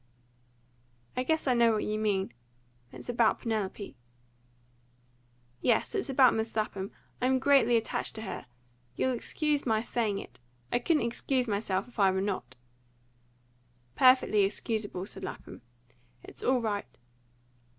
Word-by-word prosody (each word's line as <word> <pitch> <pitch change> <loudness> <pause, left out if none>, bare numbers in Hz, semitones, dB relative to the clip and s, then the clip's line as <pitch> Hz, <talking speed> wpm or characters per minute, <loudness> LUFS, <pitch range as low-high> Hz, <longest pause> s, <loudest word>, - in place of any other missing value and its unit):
"I - - 0
guess 315 +5 0
I 260 - +3
know 235 -1 +5
what 215 - 0
you 215 0 -2
mean. 195 - 0 0.6
It's - - -11
about 235 -2 +3
Penelope." 210 - -3 1.7
"Yes, - - +2
it's 400 -8 -2
about 260 -2 +6
Miss 220 0 -2
Lapham. 200 -3 -2 0.3
I 250 - +3
am 260 0 +3
greatly 265 -3 +4
attached 225 - -2
to 220 - -5
her - - -6 0.5
you'll 260 - +1
excuse 295 +4 -1
my 220 -2 +1
saying 220 -5 -1
it; 125 -10 -9 0.3
I - - +2
couldn't 315 0 +2
excuse 250 +2 +1
myself 200 -1 -1
if 245 - -13
I 195 -1 +6
were 190 0 0
not." 185 -11 -3 1.4
"Perfectly 255 -5 +5
excusable," 205 -1 -2
said - - -8
Lapham. - - -8 0.6
"It's - - -10
all 255 -1 +2
right." 205 -2 -3
225 Hz, 140 wpm, -30 LUFS, 205-255 Hz, 1.7 s, about